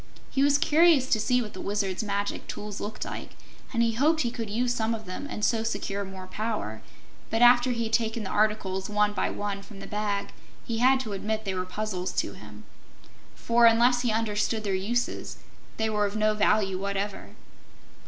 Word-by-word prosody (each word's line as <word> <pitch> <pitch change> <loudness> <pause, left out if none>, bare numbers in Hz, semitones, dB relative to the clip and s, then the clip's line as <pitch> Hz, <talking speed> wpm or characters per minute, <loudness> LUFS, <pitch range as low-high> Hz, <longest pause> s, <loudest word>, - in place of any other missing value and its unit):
He 270 - +1
was 285 0 +5
curious 315 -3 +4
to 220 - +4
see 250 +3 +2
what 210 - -9
the - - -7
Wizard's 200 -1 -1
magic 200 -1 -2
tools 210 -1 -6
looked 215 +1 -5
like, - - -7 0.4
and 235 -2 +2
hoped 315 +4 +3
he 235 - 0
could 230 -3 -5
use 240 +4 0
some 225 -1 0
of 220 -1 -9
them 185 +10 -6
and 210 - -1
so 225 -2 +2
secure 200 -3 -2
more 190 -1 -8
power; 205 - -4 0.5
but 225 +2 +2
after 245 +1 +6
he 235 -1 -1
had 225 0 -4
taken 225 -1 +1
the 190 - -5
articles, 205 -3 0
one 210 0 +2
by - - 0
one, 205 -1 -3
from 200 0 -12
the - - -8
bag, 205 -1 -2 0.4
he 225 -1 -2
had 260 +2 +5
to 220 -5 -5
admit 215 +2 -3
they 195 - -1
were 185 0 -2
puzzles 185 -1 -3
to - - -1
him. - - -12 0.7
For, 235 0 +4
unless 240 +2 +4
he 245 -2 +1
understood 215 0 0
their 200 -2 -1
uses, 225 +6 -2 0.4
they 220 - +1
were 210 -1 +1
of 200 - -7
no 215 0 +2
value 205 -2 +2
whatever. 200 - -4
215 Hz, 195 wpm, -27 LUFS, 200-235 Hz, 0.7 s, after